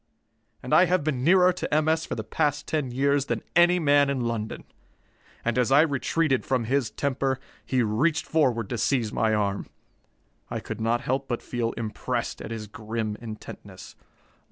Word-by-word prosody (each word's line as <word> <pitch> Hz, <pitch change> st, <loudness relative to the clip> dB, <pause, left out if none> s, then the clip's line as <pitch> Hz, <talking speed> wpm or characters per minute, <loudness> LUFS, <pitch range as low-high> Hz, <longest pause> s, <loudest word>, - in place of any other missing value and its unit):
And -, -, -3 dB
I 180 Hz, -, +7 dB
have 180 Hz, -2 st, +1 dB
been 135 Hz, -5 st, -1 dB
nearer 180 Hz, +3 st, +5 dB
to 185 Hz, -, -5 dB
M. 155 Hz, +1 st, +2 dB
S. 160 Hz, 0 st, +1 dB
for -, -, -3 dB
the 110 Hz, -, -4 dB
past 145 Hz, +5 st, -1 dB
ten 150 Hz, -5 st, -1 dB
years 140 Hz, +2 st, +1 dB
than -, -, -3 dB
any 175 Hz, +1 st, +6 dB
man 145 Hz, -3 st, +4 dB
in 135 Hz, -2 st, -1 dB
London. 115 Hz, -2 st, -3 dB, 0.8 s
And 120 Hz, +1 st, +1 dB
as 125 Hz, +1 st, +1 dB
I 140 Hz, +2 st, +7 dB
retreated 150 Hz, -1 st, +1 dB
from 130 Hz, -3 st, 0 dB
his 130 Hz, 0 st, 0 dB
temper, 135 Hz, +1 st, -1 dB, 0.2 s
he 130 Hz, -2 st, +1 dB
reached 140 Hz, +10 st, +1 dB
forward 125 Hz, -9 st, +1 dB
to 120 Hz, -, -2 dB
seize 120 Hz, -5 st, 0 dB
my 110 Hz, -1 st, +1 dB
arm. 100 Hz, -1 st, -1 dB, 0.8 s
I -, -, -3 dB
could 110 Hz, 0 st, -6 dB
not 115 Hz, +2 st, +1 dB
help 135 Hz, +2 st, -2 dB
but 120 Hz, -, -3 dB
feel 120 Hz, -2 st, -2 dB
impressed 110 Hz, -2 st, -3 dB
at -, -, -7 dB
his 115 Hz, -1 st, -5 dB
grim 110 Hz, +1 st, -4 dB
intentness. 110 Hz, -2 st, -10 dB
130 Hz, 180 wpm, -26 LUFS, 115-150 Hz, 0.8 s, I